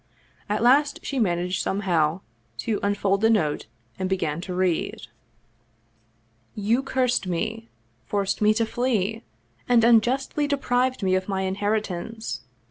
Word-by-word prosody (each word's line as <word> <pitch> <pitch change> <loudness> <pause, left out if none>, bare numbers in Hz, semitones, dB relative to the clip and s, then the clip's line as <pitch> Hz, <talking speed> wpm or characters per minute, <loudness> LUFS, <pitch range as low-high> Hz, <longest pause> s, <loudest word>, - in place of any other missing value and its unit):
At 210 +2 0
last 285 +4 +4
she 275 - -2
managed 180 -3 0
somehow 175 -4 0 0.4
to 220 -3 0
unfold 200 -1 +1
the 225 - +4
note, 155 - +1 0.3
and 185 - -1
be 190 - +1
gan 155 -2 -2
to 180 0 -5
read: 180 -2 0 0.8
" 115 0 -40 0.2
You 245 +3 +4
cursed 260 -6 0
me, 165 -10 -3 0.4
forced 200 - -1
me 210 0 +5
to 230 0 +2
flee, 225 -3 -1 0.5
and 240 -2 +5
unjustly 250 +5 +3
de 285 0 +1
prived 255 -2 0
me 185 -1 +2
of 185 +2 0
my 190 -1 -1
inheritance. 205 - -2
200 Hz, 140 wpm, -25 LUFS, 180-235 Hz, 0.8 s, me